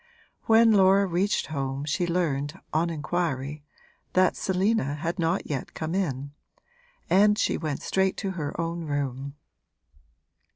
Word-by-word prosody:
When 225 0 +6
Laura 195 -1 +5
reached 190 +3 0
home 140 -1 -3
she 165 +4 0
learned, 150 -5 -1
on 165 +2 +2
inquiry, 150 -3 -2 0.5
that 185 0 +3
Selina 190 -6 0
had 170 +5 -3
not 165 +3 0
yet 140 -4 -4
come 160 +1 -3
in, 140 -7 -2 0.8
and 210 +2 +4
she - - +1
went 155 -4 -3
straight 190 0 +1
to 195 -2 -2
her 160 -4 -5
own 165 0 -2
room. 140 -1 -3
165 Hz, 130 wpm, -26 LUFS, 145-190 Hz, 0.8 s, When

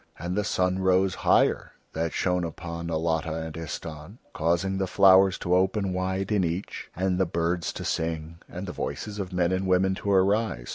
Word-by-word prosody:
And 90 +1 -4
the 105 - +1
sun 90 -2 0
rose 95 0 +3
higher - - +2 0.2
that 80 0 -1
shone 90 -1 0
upon 85 0 -6
Alatta 80 0 -1
and 80 -1 -5
Istahn, 80 +3 -7 0.2
causing 85 +4 0
the 95 - 0
flowers 95 0 +5
to 90 - -1
open 95 +1 +1
wide 95 +2 -2
in 105 -3 +2
each, 85 +3 -4
and 95 0 0
the 95 - +2
birds 85 +1 -1
to - - -6
sing 80 0 -3
and 90 +3 -6
the 90 - -5
voices 105 0 -5
of 95 -2 -4
men 90 -1 +1
and 95 +1 -1
women 95 +1 +3
to 100 - -4
arise. 100 - +1
90 Hz, 185 wpm, -26 LUFS, 85-95 Hz, 0.2 s, flowers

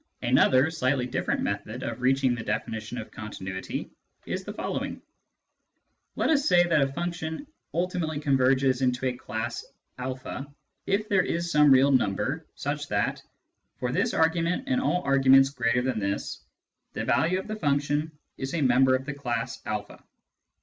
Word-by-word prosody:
Another 130 +4 +4
slightly 130 -4 0
different 125 - -1
method - - -3
of - - -4
reaching 130 0 +3
the 120 -2 -4
definition 110 +2 -3
of 110 - -7
continuity 95 -3 -6 0.3
is - - -3
the - - -6
following: - - -4 0.6
— - - -50
Let - - +1
us 290 -2 +2
say 175 0 +6
that 170 -4 +2
a 135 0 +1
function 170 - -4
" - - -52
ultimately 170 -3 -1
converges 135 -2 +2
into 125 0 +1
a 130 - +1
class 115 0 -4 0.4
a 130 +1 -5 0.2
" - - -49
if 205 +2 +1
there 200 -3 +3
is 170 -1 -2
some 150 -2 +6
real 135 +1 +6
number 100 -8 0
such - - -3
that, - - -1 0.6
for - - -2
this - - 0
argument 165 +5 +2
and 260 -2 +1
all 180 -8 0
arguments 135 0 +5
greater 125 -2 +1
than 130 -4 -1
this, 100 0 -3 0.5
the - - -3
value 175 +3 +2
of 190 - -5
the 215 - -3
function 145 -2 0 0.3
is 135 +4 -3
a 165 - 0
member 130 0 +4
of 130 +1 -3
the 140 - -4
class 120 -5 -3
a. 105 -1 -4
135 Hz, 165 wpm, -27 LUFS, 125-160 Hz, 0.6 s, say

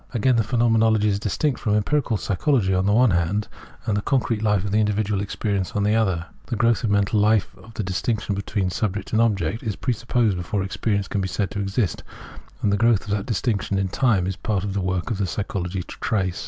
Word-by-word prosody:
Again, 125 +2 +3
the 115 - +3
Phenomenology 110 -2 +3
is 100 -1 0
distinct 120 +7 -1
from 105 -1 0
empirical 120 +2 +1
psychology 100 0 +1
on 95 +1 +1
the - - +3
one 120 +1 +5
hand, 85 +5 0 0.4
and 105 - 0
the 105 - 0
concrete 115 -3 0
Ufe 105 -3 +1
of 100 - -3
individual 105 -1 +1
experience 100 -1 -2
on 105 - 0
the 105 +1 +2
other. 95 -7 +1 0.2
The 120 - -2
growth 115 -2 +2
in 115 - +1
mental 100 +2 +2
life 105 -2 +2
of 105 +4 -16
the 110 - -2
distinction 100 +3 -1
between 100 -1 -2
subject 105 +1 -3
and 110 - +4
object 105 -3 0
is 110 -4 -3
presupposed 120 -4 0
before 95 +3 -2
experience 100 0 -1
can 100 - -1
be 95 - -1
said 95 +2 -2
to 100 - -4
exist, 100 -1 -1 0.6
a;ad 105 - +3
the 100 - +2
growth 115 -1 +3
of 105 - -7
that 105 -1 -1
distinction 105 -3 -1
in 95 -1 0
time 105 -4 +2
it - - -1
is 95 - -3
part 100 -4 -1
of 100 -1 -3
the 100 - -1
work 90 +2 -2
of 100 -4 -1
psychology 95 -2 -3
to - - -10
trace. 95 -5 0
105 Hz, 220 wpm, -23 LUFS, 95-110 Hz, 0.6 s, one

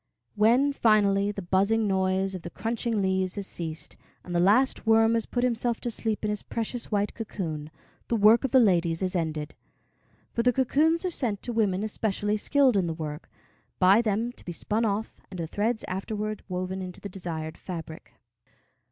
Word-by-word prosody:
When, 240 +7 +3
finally, 205 -4 +3
the 200 -2 -6
buzzing 200 +5 +2
noise 190 0 +1
of 185 - -5
the 170 - -7
crunching 225 0 -2
leaves 190 -1 0
has 200 -2 -3
ceased, 160 -3 -5 0.3
and 175 - -6
the - - +3
last 220 +7 +3
worm 225 0 +5
has 230 -1 0
put 245 - -1
himself 235 -1 0
to 240 - -2
sleep 220 -1 -2
in 210 - 0
his 210 - -3
precious 230 +1 -4
white 205 0 0
cocoon, 160 -9 -5 0.4
the 235 - 0
work 220 +3 +6
of 270 - 0
the 260 - +5
ladies 175 -6 +2
is 185 0 -1
ended; 155 -3 -2 0.8
for 235 - +1
the 250 +1 +3
cocoons 310 +7 +2
are 365 - 0
sent 225 - -2
to 240 - -4
women 205 -3 +1
especially 210 -1 -1
skilled 265 0 +3
in 185 -3 +1
the 165 - -3
work, 155 -1 -6 0.5
by 195 +4 +6
them 225 +1 -1
to - - -16
be 175 - -6
spun 215 +6 -1
off, 210 +1 -3
and 185 - -8
the 165 - -2
thread 215 +7 -1
afterwards 210 +3 -3
woven 185 +1 -3
into 180 -1 -7
the - - -6
desired 165 -4 -5
fabric. 165 -3 -8
205 Hz, 185 wpm, -27 LUFS, 185-230 Hz, 0.8 s, work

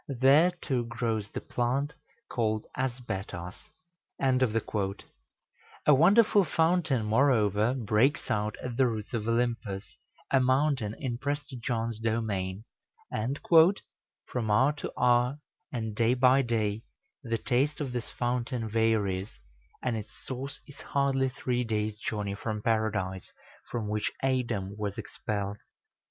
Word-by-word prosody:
There 140 +6 +5
too 135 -9 -2
grows 115 -3 -2
the - - -5
plant 135 +5 -1 0.3
called 110 -2 -1
Asbetos." 95 -8 -4 0.6
A 115 +1 -1
wonderful 200 - +6
fountain, 160 -6 +1
moreover, 110 -1 +3
breaks 120 +4 +1
out 105 0 0
at 125 -2 -4
the 130 -1 +5
roots 110 +1 -4
of 110 -2 -2
Olympus, 115 -4 -1 0.3
a 135 - +5
mountain 130 -4 +2
in 120 -4 -3
Prester 145 0 -3
John's 115 -2 -2
domain, 110 -4 -1 0.5
and 125 +7 -2 0.9
"from 115 -4 -3
hour 130 +7 +4
to 150 - -6
hour, 125 +2 +3 0.3
and 110 -5 -3
day 115 +2 +3
by 130 +1 +5
day, 110 -4 0 0.4
the 115 -1 -1
taste 135 +5 0
of 135 -5 -3
this 120 -2 -3
fountain 120 -1 -2
varies; 105 -3 +1 0.5
and 125 -3 0
its 110 -1 -5 0.2
source 135 +2 -5
is 140 -2 -14
hardly 135 -1 +1
three 125 -2 -1
days' 105 -2 -2
journey 105 -3 -2
from 105 +1 -4
Paradise, 105 -5 -1 0.4
from 115 -3 -3
which 105 0 -1
Adam 115 -7 0
was 100 -2 -3
expelled. 100 -1 -4
120 Hz, 125 wpm, -29 LUFS, 105-130 Hz, 0.9 s, wonderful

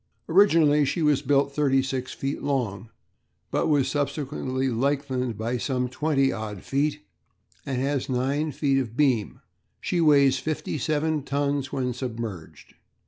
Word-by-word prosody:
Originally 165 -5 +5
she 160 +4 -1
was 150 -2 +3
built 140 0 +2
36 135 -2 0
feet 135 +1 -4
long, 120 -7 -2 0.6
but - - +1
was 145 -4 +2
subsequently 140 -2 -2
lengthened 130 -1 -1
by 115 +3 -2
some 125 -1 -1
20 135 +1 +1
odd 105 -3 -6
feet, 145 +2 -1 0.7
and 130 -2 -1
has 140 0 -1
9 135 +5 0
feet 135 -5 0
beam. 130 -8 +1 0.4
She 175 - -1
weighs 140 -4 +5
fifty 155 +1 -3
seven 155 +2 0
tons 140 0 -1
when 130 -3 -1
submerged. 115 -8 -7
135 Hz, 130 wpm, -25 LUFS, 125-145 Hz, 0.7 s, Originally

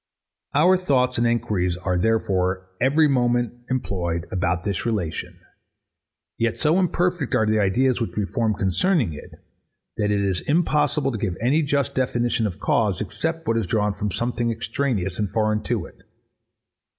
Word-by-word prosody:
Our 180 +6 +5
thoughts 125 -8 +1
and 120 - +3
enquiries 95 -7 0
are, 90 0 -1
therefore, 95 -2 0
every 150 +5 +4
moment, 120 -3 +1 0.2
employed 85 -9 -2
about 90 -1 0
this 100 -3 -2
relation: 105 -9 -3 1.0
Yet 115 -1 0
so 160 +4 +2
imperfect 180 -5 0
are 110 - +3
the 110 0 +2
ideas 120 +6 +2
which 115 - -3
we 105 - +1
form 110 +3 0
concerning 100 - +1
it, 75 - -10 0.7
that 105 - +1
it 105 -1 +1
is 95 -3 0
impossible 150 -3 +1
to 110 - -4
give 95 -4 -2
any 135 +8 +2
just 140 -2 0
definition 120 -3 0
of 90 -3 -7
cause, 100 -5 +1
except 160 +10 -3
what 115 - +2
is 110 -5 -1
drawn 105 +1 +1
from 105 +1 -3
something 120 +3 -1
extraneous 115 -4 -2
and 105 -2 0
foreign 110 0 0
to 115 -8 -1
it. - - -16
115 Hz, 160 wpm, -23 LUFS, 95-130 Hz, 1.0 s, Our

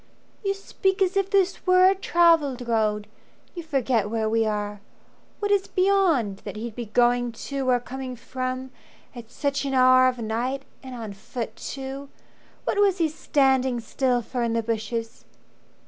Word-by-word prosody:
"You 395 -1 0
speak 385 -1 -1
as 380 +1 -1
if 390 -1 +1
this 390 -2 +1
were 365 0 +6
a 380 - +5
travelled 330 -9 +2
road. 215 -2 +1 0.5
You 345 - -6
forget 260 -9 0
where 220 0 -1
we 225 0 +1
are. 210 -1 -3 0.6
What 410 -1 -2
is 400 -1 +2
beyond 365 - +2
That - - -8
he'd 225 +1 -5
be 240 -2 -5
going 245 +2 +2
to 270 +3 -3
or 250 -1 +4
coming 255 +1 -6
from 255 +1 -5 0.4
At 235 -2 -10
such 280 +2 -2
an 275 -1 -2
hour 255 0 +6
of 255 -1 0
night, 240 +4 -2 0.2
and 260 -2 -8
on 220 -4 -6
foot 225 +4 -6
too. 275 +1 -7 0.5
What 410 - -1
was 395 -2 +4
he 330 -3 +2
standing 265 -5 +1
still 245 +1 0
for 245 +2 -4
in 235 -1 0
the 230 0 0
bushes?" 225 +1 -3
255 Hz, 165 wpm, -25 LUFS, 230-320 Hz, 0.6 s, were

